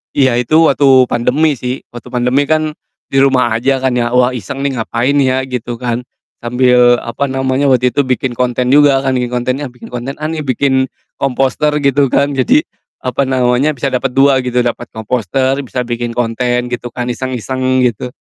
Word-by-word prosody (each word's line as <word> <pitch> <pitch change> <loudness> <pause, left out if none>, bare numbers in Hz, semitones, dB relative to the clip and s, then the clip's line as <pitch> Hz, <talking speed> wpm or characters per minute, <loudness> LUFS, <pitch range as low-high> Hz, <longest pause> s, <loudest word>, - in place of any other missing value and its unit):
Iya, 130 -3 +3
itu 125 +6 0 0.2
waktu 140 - +2 0.2
pandemi 145 +4 +1
sih, 125 +1 -4
waktu 120 -1 -10
pandemi 125 +3 0
kan 155 -1 +1 0.4
di 135 - +2
rumah 130 -3 +3
aja 130 +3 0
kan 130 - +2
ya, 120 +1 -1
"Wah 125 0 +4
iseng 125 +4 -6
nih, 135 -4 -1
ngapain 120 +4 -1
ya?" 130 -1 +1
Gitu 125 -2 -5
kan. 120 0 -4 0.3
Sambil, 125 0 +3
apa 115 +4 -3
namanya, 135 +1 0
waktu 125 -1 +3
itu 145 - -2
bikin 130 0 -1
konten 125 +1 -1
juga, 140 -2 +4
kan 135 - 0
bikin 125 -1 0
kontennya, 130 +3 -2
bikin 125 0 -13
konten 125 +3 -5
ah, 155 +1 -4
nih, 160 - -4
bikin 130 -1 0 0.3
komposter 135 +3 0
gitu 140 0 +3
kan, 140 +3 +1
jadi, 255 - +2 0.4
apa 130 +1 -1
namanya, 130 +3 +1
bisa 135 +1 -2
dapet 125 - -1
2 135 0 +4
gitu, 125 -1 0
dapet 120 0 -3
komposter, 125 +4 -1
bisa 125 - -3
bikin 120 0 -4
konten, 120 +1 -1
gitu 120 0 -4
kan, 125 0 -2
iseng-iseng 130 +1 -1
gitu. 125 0 -1
130 Hz, 180 wpm, -14 LUFS, 120-135 Hz, 0.4 s, Wah